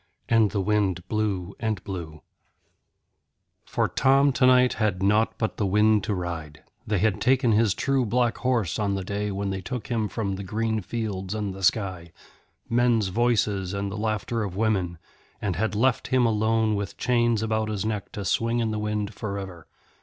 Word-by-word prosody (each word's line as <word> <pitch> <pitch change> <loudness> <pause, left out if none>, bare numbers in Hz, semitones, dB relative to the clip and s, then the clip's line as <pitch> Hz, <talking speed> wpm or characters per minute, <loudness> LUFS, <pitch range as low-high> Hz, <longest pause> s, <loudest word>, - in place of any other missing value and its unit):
And 115 -2 +4
the 100 - -1
wind 95 -3 0
blew 100 -4 -2
and 110 -4 -2
blew. 85 -5 -7 1.4
For - - 0
Tom 135 +1 +3
tonight 125 0 +5
had 95 -3 0
nought 105 +3 +2
but 110 - -2
the 105 - 0
wind 105 +1 +3
to 105 - -1
ride; 80 -5 -5 0.2
they 105 - +1
had 105 +1 +1
taken 130 -1 +3
his 110 -2 +3
true 135 -2 +1
black 120 +1 +1
horse 115 -9 0
on 100 -2 0
the 95 - -3
day 100 +2 -2
when 100 0 -2
they 95 0 -3
took 125 0 -5
from 110 -3 0
him 100 -4 -2
the 100 - -5
green 110 +3 -1
fields 100 -2 -4
and 105 -3 -3
the 95 - -9
sky, 90 -3 0 0.6
men's 115 -4 +2
voices 105 -3 +1
and 100 0 -3
the - - -5
laughter 110 +1 -2
of 95 -3 -5
women, 95 -5 0 0.4
and 100 -4 -2
had 105 +3 -1
left 120 +2 +1
him 130 -1 +3
alone 110 0 +2
with 100 -1 -3
chains 120 -3 +2
about 110 -1 0
his 105 -1 -2
neck 105 -3 -3
to 100 - -5
swing 115 +1 +1
in 115 -2 0
the 110 - -2
wind 105 0 -2
for 100 -1 -4
ever. 95 -4 -8
105 Hz, 185 wpm, -25 LUFS, 95-115 Hz, 1.4 s, tonight